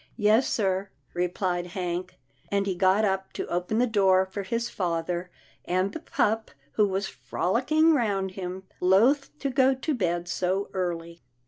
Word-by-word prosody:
" - - -36 0.2
Yes 230 +5 +4
sir," 195 -2 0 0.2
replied 175 0 -1
Hank, 180 0 -3 0.3
and 200 0 +1
he 195 - 0
got 190 +4 +3
up 190 -1 -1
to - - -3
open 180 +5 -1
the 245 - +4
door 190 -5 +3
for 190 +2 -5
his 230 +5 -2
father 175 -1 -2 0.3
and 185 +2 0
the - - -5
pup 220 +1 0 0.2
who 210 +5 +3
was 195 +1 -1
frolicking 310 - +1
round 200 -8 0
him, 185 0 -6 0.2
loth 235 +12 +3
to 275 -2 -2
go 265 0 +4
to 295 +4 -2
bed 175 -7 -1
so 185 +2 -1
early. 170 -2 -3
190 Hz, 160 wpm, -27 LUFS, 180-220 Hz, 0.3 s, Yes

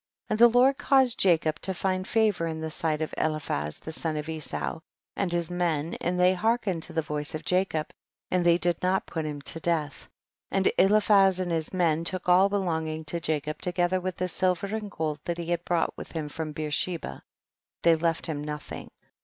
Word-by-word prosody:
38. - - +1
And 215 - -1
the - - +4
Lord 265 +2 +5
caused 265 -3 +3
Jacob 160 -4 +2
to 190 - 0
find 185 +1 -1
favor 215 -6 +2
in 160 -1 -4
the 160 0 -4
sight 155 -1 -1
of 155 - -5
Eliphaz 145 - -1
the 160 - -8
son 160 -1 -1
of 150 0 -4
Esau, 160 0 -3 0.4
and 195 -3 -1
his 175 0 0
men, 170 -3 -1
and 180 +1 -1
they 180 +1 +5
hearkened 210 -3 0
to - - -3
the 160 - 0
voice 150 0 -3
of 155 - -6
Jacob, 180 -4 0 0.4
and 180 -1 +2
they 170 0 +5
did 175 -1 0
not 185 +1 +1
put 160 -2 -4
him 145 -1 -5
to 165 - -3
death, 155 -4 -2 0.4
and 195 -1 +2
Eliphaz 195 -1 +5
and 180 -2 -2
his 160 -2 -1
men 165 -3 +1
took 185 +2 -2
all 185 +2 +6
belong 175 -6 -1
ing 155 0 -4
to 165 +2 -2
Jacob 155 -2 -2
together 180 +1 0
with 185 -1 -4
the 185 -1 -1
silver 185 +1 +1
and 215 -2 -4
gold 155 -4 -3
that 170 -1 -2
he 170 0 -4
had 175 0 0
brought 175 -2 0
with - - -9
him 155 -3 -3
from 155 +1 -5
Beersheba; 155 - -3 0.6
they 170 - +6
left 165 0 0
him 150 -3 -3
nothing. 150 0 -6
170 Hz, 205 wpm, -27 LUFS, 155-185 Hz, 0.6 s, all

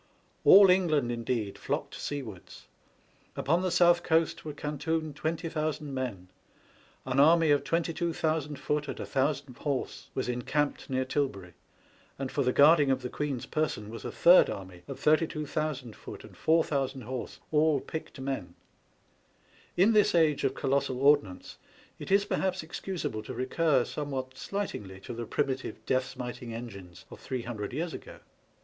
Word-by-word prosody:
All 195 -1 +9
England 155 -9 +2
indeed 115 -3 -2
flocked - - -3
seawards. 120 -11 -7 0.7
Upon 170 +5 +1
the 185 - 0
South 175 0 +5
Coast 165 -1 +1
were 155 - -5
cantoned 150 +1 -3
20,000 155 -2 -3
men; 115 -9 -4 0.8
an 130 +1 0
army 160 +1 +6
of 145 -1 +3
22,000 160 -2 -1
foot 150 +1 -2
and - - -5
1000 135 -1 -1
horse 140 -2 -3
was 130 - -1
encamped 135 +6 -1
near 130 0 0
Tilbury, 115 - -2 0.6
and 135 -1 -4
for 145 - 0
the 125 -2 +2
guarding 145 +1 +6
of 130 -1 +1
the 125 - -3
Queen's 145 -5 -3
person 130 -9 -2
was 115 - -8
a - - -4
third 175 +2 +6
army 95 -2 -7
of - - -7
82,000 155 -5 0
foot - - -10
and - - -14
4000 140 -5 +1
horse, 125 +1 -6
all 155 -1 +3
picked 160 0 -7
men. 130 -10 -4 1.2
In 200 +6 +5
this 210 -2 +4
age 155 -4 +3
of 135 -1 +1
colossal 135 -2 0
ordnance, 140 -10 +2 0.4
it - - -7
is 200 +1 +4
perhaps 190 -4 -1
ex 160 - -7
cusable 165 - -4
to - - -6
recur 130 +2 +2
somewhat 135 -3 -4
slightingly 115 - -5
to 120 - -7
the 115 -1 -5
primitive 135 -2 -2
death 130 0 +1
smiting 125 -2 -6
engines 100 -7 -9
of - - -10
three 130 -2 -4
hundred 110 -4 -5
years 160 +6 -3
ago. - - -9
140 Hz, 150 wpm, -29 LUFS, 125-160 Hz, 1.2 s, All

